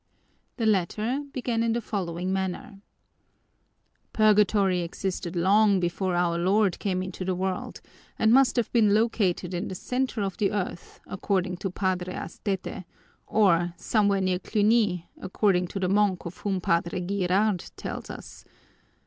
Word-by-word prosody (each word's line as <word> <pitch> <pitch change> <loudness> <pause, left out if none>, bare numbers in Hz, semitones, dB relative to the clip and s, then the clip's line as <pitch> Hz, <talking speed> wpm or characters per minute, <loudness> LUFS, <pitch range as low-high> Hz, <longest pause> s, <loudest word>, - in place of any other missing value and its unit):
The 230 - -1
latter 215 +7 0
began 240 -3 -1
in 230 -1 +1
the 235 - 0
following 185 -4 -3
manner: 190 +1 -4 1.3
"Purgatory 210 -3 +3
existed 175 0 -4
long 200 +3 +4
before 180 +1 -1
Our 175 -1 +1
Lord 195 +1 +2
came 185 -2 -1
into 185 0 -6
the 185 0 -1
world 185 0 -3 0.4
and 220 +1 +4
must 270 0 +5
have 240 -3 0
been 215 -4 +4
located 200 -5 0
in 175 - -2
the 185 - -6
center 250 +1 -2
of 195 -2 -3
the 200 - +1
earth, 185 -4 -5
according 185 -1 -2
to 195 +1 -3
Padre 185 -1 -2
Astete; 195 -2 -4 0.4
or 175 -5 +2
somewhere 200 0 +1
near 185 -1 0
Cluny, 210 -4 +1
according 190 -1 +1
to 195 - -5
the 185 - 0
monk 195 -1 +1
of 170 +1 -7
whom 195 -3 -2
Padre 170 +1 0
Girard 195 0 0
tells - - -6
us. - - -10
190 Hz, 145 wpm, -26 LUFS, 180-210 Hz, 1.3 s, must